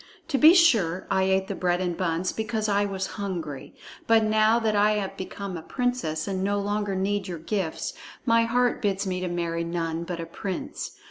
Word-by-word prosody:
To 275 - +1
be 320 +3 +8
sure, 210 - +4
I 190 0 +3
ate 190 0 +1
the 200 - -3
bread 180 -2 0
and 180 -2 -1
buns 175 0 -1
because 220 -1 -2
I 205 0 +2
was 195 -1 -2 0.2
hungry. 165 -9 -5 0.3
But 225 -1 +5
now 215 +1 +4
that 220 -2 +1
I 210 +1 +4
am 205 -2 -2
become 190 0 -6
a 165 - -5
princess 245 -8 -2
and 190 -1 -2
no 205 +1 +1
longer 205 0 -1
need 195 +1 -1
your 175 -2 -4
gifts, 185 - -3 0.3
my 230 -1 +4
heart 245 +1 +1
bids 200 -2 0
me 185 -1 -2
to 185 - -2
marry 170 -1 -2
none 165 -1 -2
but 170 0 -5
a 165 - -4
prince. 180 +2 -5
195 Hz, 200 wpm, -26 LUFS, 175-215 Hz, 0.3 s, be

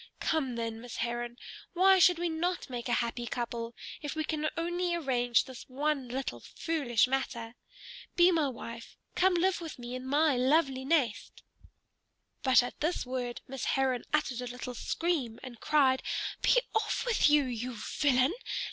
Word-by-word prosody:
Come, 270 -6 0
then, 230 -1 -4
Miss 245 -1 -8
Heron, 240 0 -3 0.4
why 380 +1 +5
should 355 0 +6
we 345 +1 -1
not 340 -2 -2
make 245 0 -4
a - - +2
happy 235 +1 -5
couple, 235 -1 -4 0.3
if 295 0 -4
we 315 - -1
can 310 0 -1
only 345 +1 0
arrange 245 -7 +2
this 260 0 -11
one 280 0 -1
little 250 - -3
foolish 275 - 0
matter? 235 -3 -2 0.6
Be 350 +1 +6
my 320 -4 +2
wife: 230 -2 -9 0.2
come 370 0 +3
live 360 +1 +1
with 325 -3 -7
me 245 0 -7
in 255 +1 -5
my 295 +1 +3
lovely 265 0 +2
nest." 270 -8 0 1.0
But 260 -2 +5
at 245 - -7
this 320 0 -1
word 250 -1 -4
Miss 265 0 -5
Heron 260 -2 +1
uttered 265 -5 0
a 250 - -4
little 250 +1 -6
scream 265 -4 -2
and 240 -3 -9
cried, 270 -4 +3 0.4
"Be - - +5
off 440 - 0
with 465 -10 +4
you, 295 -1 +5
you 250 -1 -4
villain! 260 - +2
265 Hz, 165 wpm, -30 LUFS, 245-320 Hz, 1.0 s, should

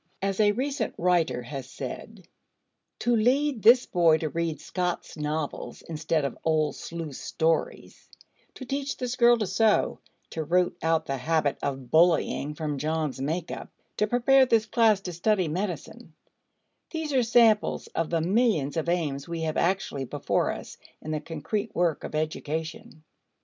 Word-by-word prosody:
As 195 0 -2
a 210 -1 +5
recent 275 +5 -2
writer 170 -7 +1
has 130 +1 -7
said: - - -8 0.7
"To 240 0 +2
lead 255 +3 +2
this 245 +4 +7
boy 165 -3 +4
to 155 -1 -3
read 165 0 -2
Scott's 180 -1 -3
novels 150 0 -4
instead 155 -1 -1
of 140 - -5
old 155 -2 +1
Sleuth's 165 -5 -6
stories; 160 0 -2 0.5
to 260 - -8
teach 275 +2 -3
this 250 -1 -3
girl 240 -1 +5
to 215 - -1
sew; 220 +2 +2 0.3
to 160 - -3
root 175 +3 +1
out 160 0 +1
the 135 - -2
habit 155 +1 0
of 135 -3 -4
bullying 160 -3 +3
from 150 -2 -3
John's 155 -2 -2
make 160 +5 -2
up; - - -7 0.3
to 210 - +2
prepare 260 +3 +4
this 225 -2 +3
class 220 -3 +3
to 180 -2 -6
study 185 +1 +1
medicine, 180 +4 -5 0.7
these 320 -3 -4
are 260 - +4
samples 230 -2 +3
of 165 -1 -1
the 165 -1 0
millions 175 - +1
of 160 +1 -1
aims 150 -6 -1
we 170 -1 -4
have 160 -1 -2
actually 175 -7 0
before - - -1
us - - -6 0.3
in 155 - -5
the 155 -1 -2
concrete 170 +8 -4
work 170 -3 +1
of - - -6
education." 155 0 -4
170 Hz, 160 wpm, -27 LUFS, 155-215 Hz, 0.7 s, this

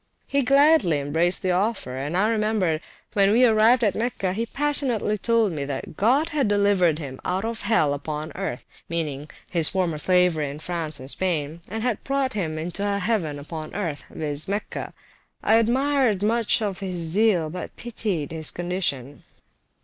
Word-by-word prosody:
He 280 - +1
gladly 275 - +4
embraced 160 +6 +1
the 185 - +1
offer, 190 - -1
and 145 +6 -2
I 205 +3 +3
remember 215 -7 +1 0.3
when 200 -1 +4
we 245 +4 +5
arrived 230 +2 +4
at 205 - +3
Mecca 220 -5 -2
he 230 +4 -2
passionately 270 -6 0
told 225 -1 +2
me, 150 -4 -3
that 140 +1 -5
God 265 - +2
had 295 -6 0
delivered 200 -6 +3
him 135 -4 -7
out 185 +4 -1
of 230 0 -4
hell 200 -9 +2
upon 150 +2 -5
earth 195 0 -4 0.2
(meaning 150 -3 -3 0.2
his 165 -3 +3
former 175 -5 -1
slavery 180 -4 +3
in 140 - -7
France 155 -2 -4
and 130 +2 -3
Spain), 165 -3 -1
and 220 +3 -4
had 245 -4 -1
brought 275 -1 0
him 165 -7 -2
into 175 +5 -3
a 200 0 0
heaven 185 -7 -1
upon 155 +3 -7
earth, 170 -8 -3
viz. 150 -1 -2
Mecca. 205 +2 -4 0.5
I 220 - +5
admired 245 -2 +2
much 230 +1 +3
his 195 -4 -3
zeal, 175 0 +1
but 180 - -7
pitied 205 -10 -3
his 160 -2 -3
condition. 170 -7 -2
190 Hz, 165 wpm, -24 LUFS, 155-225 Hz, 0.5 s, we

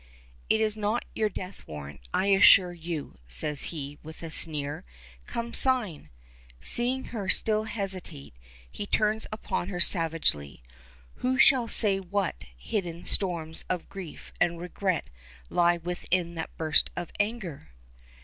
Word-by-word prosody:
"It 220 - +4
is 215 -1 +1
not 215 +2 -1
your 215 -1 +1
death 185 -1 -7
warrant, 70 -3 -8
I - - +1
assure 190 -2 +7
you," 165 - -6
says 105 - -4
he, 145 -3 -6
with 160 +2 -11
a 165 - -6
sneer. 145 -3 -2 0.4
"Come, 235 0 -4
sign!" 225 - +1 0.5
Seeing 250 - +3
her 205 -4 -3
still 215 0 +4
hesitate, 190 - -4 0.4
he 205 - -6
turns 215 +1 +1
upon 215 -4 -3
her 180 -3 -4
savagely. 160 - +2 0.5
Who 260 +1 0
shall 265 -4 +5
say 200 -4 +4
what 190 - -2
hidden 170 - -4
storms 165 -4 0
of 180 -2 -2
grief 190 -5 -9
and 170 -1 +2
regret 180 0 -2 0.4
lie 175 0 +4
within 175 0 -2
that 160 -1 -6
burst 160 -2 +3
of 175 - -4
anger? 205 - -3
180 Hz, 135 wpm, -28 LUFS, 160-210 Hz, 0.5 s, assure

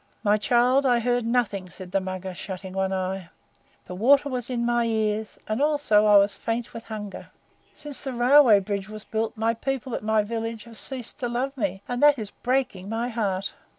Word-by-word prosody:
"My 210 -1 +4
child, 245 +5 +3
I 245 -3 +3
heard 245 0 0
nothing," 210 -6 0
said 180 0 -11
the 195 - +1
Mugger, 185 0 -5
shutting 190 +1 -7
one 190 0 0
eye. 185 -1 -3 0.6
"The - - -8
water 275 +9 +4
was 250 -2 -3
in 240 -2 -1
my 240 0 +2
ears, 220 -1 -1
and 215 +5 -1
also 290 -9 +3
I 205 -1 +7
was 200 0 +4
faint 230 +1 -3
with 230 0 -8
hunger. 210 -3 -7 0.5
Since 295 -2 -7
the 265 - -3
railway 245 -3 +6
bridge 200 0 -4
was 215 0 -8
built 225 +1 -3
my 225 +1 +1
people 260 +1 -3
at - - -2
my 215 0 +2
village 225 0 -4
have 230 -1 -9
ceased 260 0 -6
to 245 -3 -2
love 260 +3 -2
me; 195 -5 -2
and 245 0 -3
that 295 -1 +6
is 210 -3 -6
breaking 245 -7 -2
my 230 +2 -2
heart." 200 -5 -2
225 Hz, 200 wpm, -25 LUFS, 200-245 Hz, 0.6 s, I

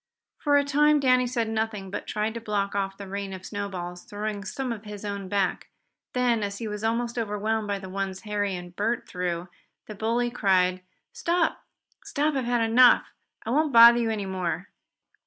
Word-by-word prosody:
For 290 -1 +3
a 285 - +4
time 295 +1 +4
Danny 255 -2 +3
said 235 -2 -1
nothing, 220 -3 -2
but - - -5
tried 215 +1 -1
to 230 - -6
block 205 -2 -1
off 195 -1 -2
the 200 - -8
rain 200 0 -4
of 190 0 -8
snowballs, 185 -4 -5
throwing 205 0 -4
some 255 +5 -4
of 215 -2 -9
his 210 -1 -8
own 200 -2 -4
back. 195 -2 0 0.5
Then, 245 -3 +2
as 200 -1 -3
he 230 - -4
was 210 0 -5
almost 235 +1 -1
overwhelmed 215 0 -1
by 200 -1 -1
the 190 -1 -8
ones 190 0 -4
Harry 205 -3 -1
and 175 0 -9
Bert 225 +5 -1
threw, 180 -1 -3 0.4
the 215 - -8
bully 230 +3 0
cried: 185 -5 +2 0.3
"Stop! 355 -8 0 0.4
Stop! 300 +2 0
I've 265 -3 -1
had 240 -1 +1
enough! 245 +2 +5 0.3
I 225 - -2
won't 305 +3 +2
bother 235 +1 +9
you 230 -1 0
any 210 -3 -2
more!" 185 0 -3
210 Hz, 190 wpm, -26 LUFS, 195-240 Hz, 0.5 s, bother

